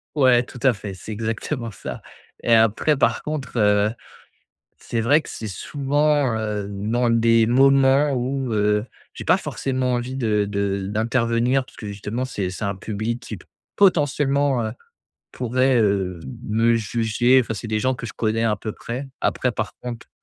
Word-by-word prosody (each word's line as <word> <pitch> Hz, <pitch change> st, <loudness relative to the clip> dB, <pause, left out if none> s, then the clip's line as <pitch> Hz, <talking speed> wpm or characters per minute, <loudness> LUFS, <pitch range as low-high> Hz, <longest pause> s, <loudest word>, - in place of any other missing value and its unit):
Ouais 130 Hz, -4 st, +5 dB
tout 125 Hz, -, -11 dB
à 130 Hz, -4 st, +4 dB
fait, 100 Hz, 0 st, -7 dB
c'est 95 Hz, +4 st, -10 dB
exactement 115 Hz, +3 st, -3 dB
ça. 95 Hz, -, -8 dB, 0.4 s
Et 115 Hz, -, +1 dB
après 115 Hz, +6 st, +3 dB
par -, -, +2 dB
contre, 150 Hz, -5 st, -5 dB
heu, 105 Hz, -1 st, +3 dB, 0.9 s
c'est 115 Hz, -1 st, -3 dB
vrai 145 Hz, +7 st, +4 dB
que -, -, -13 dB
c'est 110 Hz, -, -6 dB
souvent, 145 Hz, +3 st, 0 dB
heu, 105 Hz, -2 st, -2 dB
dans 115 Hz, +5 st, 0 dB
des 115 Hz, -1 st, +4 dB
moments 135 Hz, +3 st, +4 dB
où, 130 Hz, 0 st, -2 dB
heu, 105 Hz, +2 st, +1 dB, 0.3 s
j'ai -, -, -9 dB
pas -, -, +5 dB
forcément 130 Hz, -1 st, -2 dB
envie 125 Hz, +2 st, -2 dB
de 105 Hz, -5 st, +1 dB
de 100 Hz, -1 st, -1 dB
d'intervenir 115 Hz, +4 st, +1 dB
puisque -, -, -13 dB
justement 105 Hz, +5 st, -4 dB
c'est 100 Hz, -7 st, -3 dB
c'est 95 Hz, +3 st, -5 dB
un 100 Hz, 0 st, -1 dB
public 110 Hz, +4 st, -4 dB
qui 115 Hz, -4 st, -7 dB
p -, -, -16 dB, 0.3 s
potentiellement, 145 Hz, -, +2 dB
heu, 110 Hz, -, -3 dB, 0.6 s
pourrait, 130 Hz, +1 st, +1 dB
heu, 95 Hz, -4 st, 0 dB, 0.3 s
me 115 Hz, +2 st, +3 dB
juger, 115 Hz, +3 st, +2 dB
enfin 110 Hz, -, -4 dB
c'est 110 Hz, +2 st, -6 dB
des 110 Hz, 0 st, 0 dB
gens 130 Hz, +4 st, +1 dB
que 120 Hz, -2 st, -6 dB
je -, -, -8 dB
connais 110 Hz, 0 st, -1 dB
un 110 Hz, -2 st, +2 dB
peu 110 Hz, +2 st, -5 dB
près. 125 Hz, +6 st, -6 dB
Après 125 Hz, -, 0 dB
par 110 Hz, -, -4 dB
contre 120 Hz, -2 st, -7 dB
115 Hz, 170 wpm, -22 LUFS, 105-130 Hz, 0.9 s, Ouais